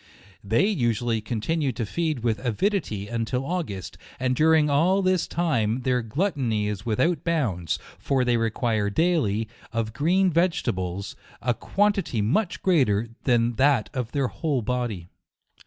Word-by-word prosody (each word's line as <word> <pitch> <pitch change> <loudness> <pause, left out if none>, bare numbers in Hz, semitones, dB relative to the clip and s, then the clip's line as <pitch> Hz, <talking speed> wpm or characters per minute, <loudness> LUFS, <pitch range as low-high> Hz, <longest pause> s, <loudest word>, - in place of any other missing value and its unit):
They 110 - +2
usu 120 - 0
ally 115 -2 +1
continue 130 +7 -1
to 110 +1 -3
feed 155 +2 -2
with 115 0 0
avidity, 120 - -1
until 115 +3 -2
Au 180 +4 0
gust, 100 - -7 0.2
and 130 0 +1
during 155 +1 +4
all 175 +7 +3
this 185 -2 +2
time 125 -9 0
their 125 0 +1
gluttony 120 - -1
is 105 +1 -4
without 155 +8 +1
bounds; 110 - 0 0.2
for 130 -2 +1
they 120 -1 +2
require 115 -2 0
daily, 115 - +1 0.2
of 115 -1 -2
green 180 +8 +2
vegetables, 110 - -1 0.2
a 120 0 +1
quantity 200 - 0
much 170 - 0
greater 120 - +2 0.2
than 120 -2 +2
that 135 -5 +3
of 125 -4 -3
their 140 -2 0
whole 145 -7 -1
body. 120 -8 -2
125 Hz, 145 wpm, -25 LUFS, 110-160 Hz, 0.2 s, during